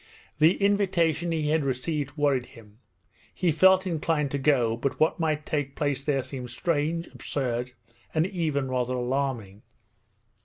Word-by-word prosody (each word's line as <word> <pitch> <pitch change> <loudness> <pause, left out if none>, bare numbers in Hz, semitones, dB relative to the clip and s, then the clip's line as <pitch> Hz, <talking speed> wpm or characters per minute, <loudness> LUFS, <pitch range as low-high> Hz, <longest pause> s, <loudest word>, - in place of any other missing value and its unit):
The 160 +4 +5
invitation 175 -5 +2
he 155 -2 0
had 160 -1 +2
received 140 +2 -2
worried 140 -4 +1
him. 110 -1 -17 0.6
He 180 -2 +1
felt 190 +4 +5
inclined 160 -4 0
to 140 - -1
go, 130 -5 +2
but 130 +4 -3
what 155 +2 +2
might 155 -2 0
take 145 -3 -2
place 145 -2 -1
there 140 -2 0
seemed 125 -2 -7
strange, 165 +5 -1
absurd, 125 -2 -3 0.4
and 155 +1 +2
even 160 -8 -1
rather 125 -1 -1
alarming. 125 -5 -2
145 Hz, 145 wpm, -26 LUFS, 130-165 Hz, 0.6 s, The